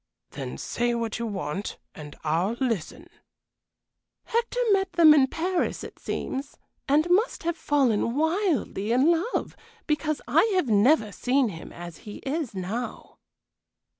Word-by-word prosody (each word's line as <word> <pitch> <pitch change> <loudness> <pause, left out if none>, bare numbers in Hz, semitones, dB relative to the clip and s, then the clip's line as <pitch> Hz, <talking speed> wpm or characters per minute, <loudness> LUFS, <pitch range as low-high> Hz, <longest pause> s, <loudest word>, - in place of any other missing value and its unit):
"Then - - -6
say 240 0 -1
what 230 -1 -2
you 235 - -2
want, 195 -1 -4 0.2
and 150 -1 -10
I'll 165 +7 +1
listen." 235 - -3 1.2
"Hector 475 +1 -1
met 385 -2 +2
them 330 -3 +8
in 275 -3 +5
Paris, 350 +5 -1
it - - -10
seems, 275 +1 -4 0.3
and 300 +4 +4
must 410 +3 +2
have 340 0 0
fallen 255 -7 +1
wildly 315 - 0
in 270 +7 +5
love, 345 +9 -1 0.3
because 305 0 0
I - - +4
have 360 -9 +1
never 215 +2 +4
seen 255 +3 +1
him 165 -4 -9
as 175 -1 -9
he 210 - -10
is 275 -5 -2
now." 200 +7 -5
265 Hz, 135 wpm, -26 LUFS, 210-325 Hz, 1.2 s, them